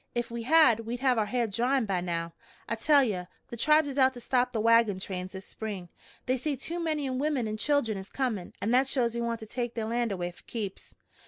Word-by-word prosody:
Ef 240 -1 -2
we 235 0 -4
had, 260 -3 +5
we'd 235 +2 -5
have 255 -4 +3
our 210 - +1
ha'r 240 +2 0
dryin' 240 +4 +1
by 190 -3 -1
now. 170 -1 -3 0.3
I - - -1
tell 280 +5 +4
ye, 190 -7 -2 0.2
the - - -6
tribes 305 +5 +4
is 280 0 -3
out 260 0 +4
to - - -7
stop 250 +1 +1
the 225 - -2
wagon 230 -2 +4
trains 185 0 -5
this 190 0 -8
spring. 200 -5 -6 0.4
They 255 +1 +1
say 285 +3 -2
too 335 +6 -5
many 310 -4 -1
womern 265 -2 0
and 215 0 -4
children 235 -7 +1
is 190 - -10
comin', 235 -9 -2
an' 215 - 0
that 260 +2 +4
shows 245 -4 +1
we 235 - -2
want 235 -1 -2
to - - -6
take 240 +1 -4
their 225 -2 -2
land 235 0 0
away 175 -2 -3
fer - - -19
keeps. 205 -5 -6
235 Hz, 240 wpm, -29 LUFS, 210-260 Hz, 0.4 s, had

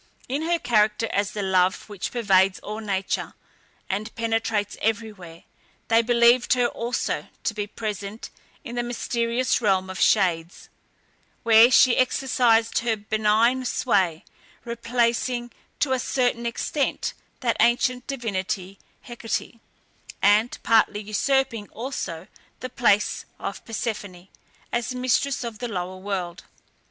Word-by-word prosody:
In 275 +4 -2
her 345 - +3
character 220 -4 +2
as 200 0 0
the 205 - -3
love 185 -1 +1
which 205 -3 -5
pervades 195 -5 +3
all 215 +1 -6
nature, 195 -3 -2 0.5
and 210 +3 -4
penetrates 225 -2 -1
everywhere, 205 -7 -3 0.5
they 230 0 +5
believed 235 +1 +4
her 250 -1 +2
also 240 0 -2 0.2
to 225 - 0
be 205 -1 -3
present 210 0 -6 0.3
in 235 - -7
the 240 - 0
mysterious 240 +1 -1
Realm 190 -3 +1
of 190 - -7
Shades, 175 -4 +1 0.7
where 230 +1 +7
she 255 -1 +5
exercised 245 -3 +2
her 230 -2 0
benign 220 +4 +2
sway, 190 -9 0 0.4
replacing 240 +1 -1 0.3
to 280 - +2
a 260 - +2
certain 245 -2 0
extent 275 +4 -2 0.3
that 235 -3 +1
ancient 245 +2 +2
divinity 195 -6 -3 0.2
Hecate, 230 -1 -5 0.6
and 210 +4 +3
partly 220 -2 +3
usurping 230 +1 0
also 205 -9 -5 0.3
the 255 - -6
place 210 -5 +2
of - - -6
Persephone, 200 -5 -5 0.4
as 240 +1 -2
mistress 255 +2 0
of 230 -3 -6
the 245 - -3
lower 185 -3 -4
world. 185 -3 -4
225 Hz, 125 wpm, -24 LUFS, 200-240 Hz, 0.7 s, where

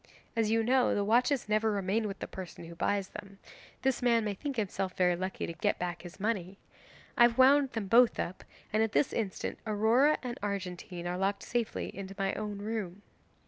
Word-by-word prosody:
As 225 -2 +1
you 225 +1 +2
know 250 +2 +3
the 205 - +1
watches 245 +5 +2
never 215 +1 +2
remain 205 +2 0
with 195 -1 -5
the - - -5
person 185 -2 -8
who 170 - -9
buys 195 +3 -1
them, 200 -1 -10 0.5
this 265 -1 +1
man 235 -2 +3
may 210 - -1
think 280 +7 -5
himself 195 -4 -2
very 180 -1 +3
lucky 185 +2 -3
to 170 - -5
get 165 - 0
back 175 -2 -4
his 175 +2 -11
money. 195 -3 -2 0.6
I - - +1
have 240 0 +6
wound 270 +1 +5
them 225 -3 -2
both 235 +4 +5
up, 185 - -4 0.3
and 215 - +3
at 225 -1 0
this 285 - +2
instant 210 -5 -3
Aurora 225 +8 +4
and 245 -1 -5
Argentine 185 -3 -4
are 180 +1 -2
locked 195 +1 0
safely 240 -2 -2
into 195 0 -7
my 195 -1 0
own 210 -1 -4
room. 205 -2 -4
210 Hz, 200 wpm, -31 LUFS, 190-230 Hz, 0.6 s, have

